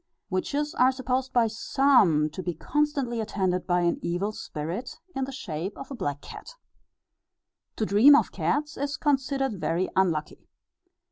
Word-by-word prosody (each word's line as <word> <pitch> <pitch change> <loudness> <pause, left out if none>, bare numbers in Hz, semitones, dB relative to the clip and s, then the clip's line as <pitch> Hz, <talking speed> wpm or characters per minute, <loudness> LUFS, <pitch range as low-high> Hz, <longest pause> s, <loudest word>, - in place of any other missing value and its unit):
Witches 290 - -1
are 255 -3 +4
supposed 260 0 -2
by 240 -2 +3
some 220 - +3
to 185 - -6
be 175 -2 -3
constantly 280 - -1
attended 190 -4 -1
by 175 -1 +2
an 170 0 +1
evil 180 +5 -1
spirit, 190 - -6 0.2
in 270 -1 -1
the 270 - -7
shape 185 - -5
of 270 - -9
a - - -4
black 145 - -3
cat. - - -11 1.2
To 220 - -1
dream 225 +9 +7
of - - +2
cats 300 +1 -1
is 285 +1 -2
considered 270 - 0
very 175 +3 0
unlucky. 165 -5 0
230 Hz, 150 wpm, -26 LUFS, 180-270 Hz, 1.2 s, dream